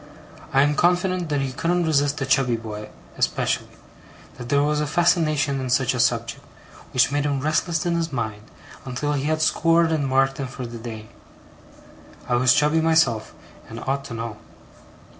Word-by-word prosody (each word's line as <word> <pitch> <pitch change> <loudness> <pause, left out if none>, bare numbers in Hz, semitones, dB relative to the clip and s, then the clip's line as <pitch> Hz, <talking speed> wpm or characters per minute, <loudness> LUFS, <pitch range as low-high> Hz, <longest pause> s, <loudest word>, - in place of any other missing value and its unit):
I 135 0 +4
am 145 +1 +2
confident 180 +1 +1
that 145 -2 0
he 135 -1 -2
couldn't 175 +5 0
resist 145 -1 +1
a - - 0
chubby 130 -2 +2
boy, 105 -2 -7 0.3
especially; - - -1 0.6
that 120 0 -7
there 140 0 +3
was 150 0 +1
a 150 - -1
fascination 155 -3 +2
in 130 -1 -4
such 130 0 +2
a 125 - -3
subject, 115 0 0 0.5
which 125 +1 +3
made 145 0 0
him 145 -2 0
restless 155 +3 0
in 175 - +1
his 165 -1 -1
mind, 110 -5 -3 0.4
until 135 +3 -2
he 140 -1 -2
had 155 +1 0
scored 165 +1 +3
and 150 -4 0
marked 135 +1 +1
him 135 - -3
for 125 0 -7
the 120 0 -8
day. 110 -2 -8 1.2
I - - -1
was 130 +2 +4
chubby 150 +2 +3
myself, 160 -9 +2 0.3
and 115 0 -7
ought 135 +1 -2
to 120 - -7
know. 115 -2 -5
140 Hz, 180 wpm, -23 LUFS, 125-155 Hz, 1.2 s, I